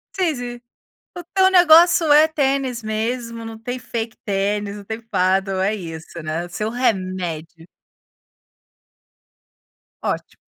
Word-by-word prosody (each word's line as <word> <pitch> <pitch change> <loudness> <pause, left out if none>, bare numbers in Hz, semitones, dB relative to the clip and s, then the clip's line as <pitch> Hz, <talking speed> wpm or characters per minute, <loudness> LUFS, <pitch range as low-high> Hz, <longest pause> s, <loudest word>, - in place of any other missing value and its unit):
Sei 350 -6 +1
sim. 245 -1 -6 0.5
O 350 - -7
teu 380 0 +5
negócio 345 -2 +6
é 305 +2 +7
tênis 275 -5 0
mesmo, 230 +1 -3
não 225 0 -7
tem 245 +2 -4
fake 230 -2 -5
tênis, 205 0 -1
não 205 - -10
tem 220 +2 -5
Padel, 190 -3 0
é 205 +3 +1
isso 165 -3 -8
né 160 +3 -3
o - - -12
seu 210 +5 -3
remédio. 185 -8 -2 2.4
Ótimo. - - -3
225 Hz, 125 wpm, -21 LUFS, 190-255 Hz, 2.4 s, é